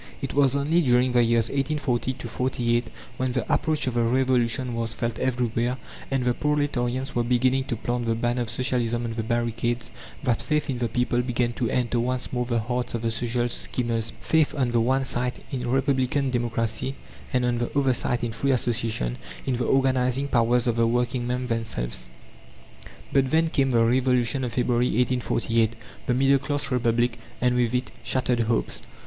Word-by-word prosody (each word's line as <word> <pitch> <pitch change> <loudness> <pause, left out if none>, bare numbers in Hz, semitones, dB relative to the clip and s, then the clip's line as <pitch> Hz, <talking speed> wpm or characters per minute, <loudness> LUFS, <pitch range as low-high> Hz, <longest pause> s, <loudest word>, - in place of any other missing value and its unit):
It 135 - -4
was 140 -1 +3
only 150 +5 +2
during 125 -3 +3
the 125 0 +4
years 115 -1 +2
1840 135 -3 -1
48, 120 -1 0 0.3
when 130 -1 -1
the 125 - -1
approach 155 -2 +1
of 130 - -1
the 120 - +1
Revolution 125 0 +2
was 115 -1 -2
felt 115 0 -3
everywhere, 120 -1 0 0.3
and 135 -2 0
the 125 - +3
proletarians 135 -3 -1
were 120 - +1
beginning 125 +2 +2
to 120 - -2
plant 120 +1 -2
the 115 - +1
banner 120 +2 0
of 120 - -3
Socialism 120 -1 0
on 115 - -3
the 115 - -2
barricades, 120 +1 -1 0.3
that 125 -4 +1
faith 150 -1 0
in 125 - -3
the 120 - 0
people 125 +1 +1
began 120 -1 -1
to 120 -1 -1
enter 120 -1 0
once 125 +2 -2
more 125 -1 -1
the 120 -1 0
hearts 125 +2 -2
of 115 - -4
the 115 - 0
social 120 +1 0
schemers: 115 -2 -1
faith, 160 -2 +2
on 130 -4 0
the 120 - +2
one 130 +3 +2
side, 125 -1 -1
in 125 -2 -3
Republican 135 0 +1
Democracy, 120 +1 -1 0.4
and 125 -1 +1
on 120 -1 0
the 120 - -1
other 135 -2 +3
side 120 0 0
in 120 - -1
free 115 +5 -2
association, 115 - 0 0.3
in 130 -2 0
the 125 - -1
organizing 130 0 +2
powers 120 -1 +2
of 120 -1 0
the 115 0 +3
working 120 +1 0
men 125 +1 -1
themselves. 110 - -2 1.1
But 135 -1 +3
then 160 +3 +2
came 135 -3 +1
the 115 -2 +3
Revolution 125 +1 +2
of 120 -3 -3
February, 120 0 +1
1848, 115 -2 +1 0.3
the 125 - +2
middle 135 +1 +4
class 140 +1 -2
Republic, 120 -1 +1 0.2
and 125 0 +2
with 125 -1 +1
it, 125 +1 -2
shattered 125 0 +1
hopes. 115 0 -1
125 Hz, 185 wpm, -25 LUFS, 120-130 Hz, 1.1 s, the